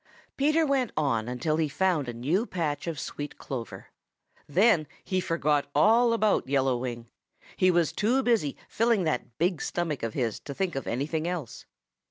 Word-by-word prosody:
Peter 305 +3 +3
went 270 -5 +1
on 120 -7 +1
until 140 +6 -1
he 160 -2 +1
found 165 -4 +1
a - - -4
new 155 - 0
patch 155 -4 -2
of 165 -3 -3
sweet 145 0 -6
clover. 120 -6 -7 0.6
Then 175 -1 +4 0.2
he 185 -1 -1
forgot 150 -4 0
all 230 +9 +5
about 215 - +1
Yellow 135 -2 +2
Wing. 120 -1 -5 0.5
He 185 - +3
was 170 -3 +2
too 245 +6 +1
busy 225 - +1
filling 230 -3 +2
that 125 -6 -2
big 175 -1 +1
stomach 165 -5 -2
of 115 -1 -3
his 115 -5 -1
to 140 - -8
think 190 -5 -1
of 135 - -4
anything 155 +7 -1
else. 175 -8 -5
155 Hz, 170 wpm, -27 LUFS, 135-195 Hz, 0.6 s, all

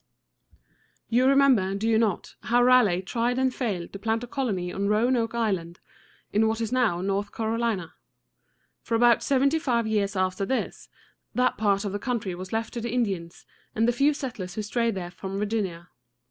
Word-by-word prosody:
You 245 +3 +3
remember, 265 -9 +4
do 210 +3 -2
you 225 -1 +3
not, 215 -5 -1
how 245 +1 +2
Raleigh 230 -8 +4
tried 240 +5 -1
and 260 -1 +1
failed 200 -10 -3
to 200 - -7
plant 225 +2 -1
a - - -6
colony 200 -10 -2
on 200 +1 -1
Roanoke 230 +2 +1
Island, 190 -7 -1 0.5
in 215 +2 +3
what 220 0 -1
is 225 -1 -2
now 230 -9 +1
North 200 +2 -1
Carolina? 225 -5 -2 0.9
For 230 - -2
about 240 +1 +5
seventy 280 +3 +2
five 235 -6 0
years 210 -2 0
after 185 +1 0
this, 260 +6 -3 0.5
that 250 0 +2
part 200 -1 +1
of 200 - -2
the 205 - -3
country 225 -5 -2
was 185 +1 -8
left 225 0 -2
to 235 - -4
the 235 - -3
Indians 195 -8 -2 0.3
and 225 +1 +2
the - - +4
few 280 +4 +2
settlers 210 - -6
who 215 - -3
strayed 230 +1 0
there 175 -2 -5
from 190 +2 -6
Virginia. 200 -5 -2
220 Hz, 180 wpm, -26 LUFS, 195-240 Hz, 0.9 s, about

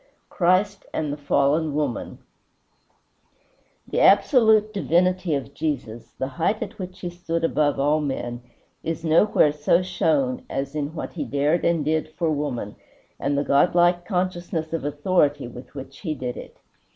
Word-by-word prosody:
XIV - - -37
CHRIST 190 +2 +1
AND 150 -2 -1
THE - - -5
FALLEN 145 +1 +1
WOMAN 145 -6 -2 1.7
The - - -1
absolute 215 +1 +5
divinity 180 -2 +1
of 140 0 -5
Jesus, 130 -7 -4
the 130 - -2
height 210 +6 +1
at 210 +2 -10
which 185 0 -7
he 175 - -3
stood 170 -1 -3
above 150 -3 +1
all 150 +2 +2
men, 120 -4 -3 0.4
is 165 0 -4
nowhere 160 -1 +4
so 150 +4 +2
shown 250 - 0
as 135 +1 -3
in 150 +1 -3
what - - -5
he 165 - -3
dared 145 +4 0
and 165 -3 +1
did 155 0 0
for 165 -1 0
woman, 140 -8 -3 0.4
and 140 +1 0
the 140 - +1
godlike 175 +5 +3
consciousness 175 -4 -2
of 165 - -2
authority 145 -2 +1
with 125 +3 -12
which 135 0 -9
he 160 -6 -3
did 125 -3 -4
it. - - -10
160 Hz, 155 wpm, -24 LUFS, 145-180 Hz, 1.7 s, absolute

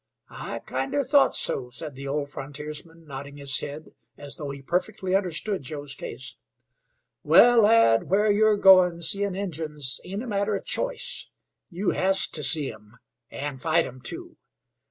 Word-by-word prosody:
"I - - -5
kinder 135 - -1
thought 285 +1 +4
so," 125 -2 -2
said 150 +3 -6
the 135 +1 -8
old 145 0 -2
frontiersman, 150 +4 -8
nodding 140 0 -8
his 140 -2 -1
head 150 +2 -8 0.2
as 145 -1 -8
though 145 -2 -5
he 140 0 -8
perfectly 185 +4 -2
understood 195 +1 -1
Joe's 145 0 -5
case. 135 -1 -8 0.8
"Well, 230 +10 +6
lad, 210 - +4
where 205 +3 +3
you're 215 0 +3
goin' 185 -3 +6
seein' 200 +2 -1
Injuns 155 -8 -3
ain't 200 +5 -5
a - - -7
matter 205 -1 0
of 195 - -5
choice. - - -2 0.4
You 185 +1 -1
has 190 +1 +2
to 150 - -3
see 140 +1 +3
'em, 105 +2 -18 0.3
and 140 -2 -6
fight 165 +1 +2
'em, 130 0 -10
too. 345 - -4
160 Hz, 155 wpm, -25 LUFS, 140-200 Hz, 0.8 s, Well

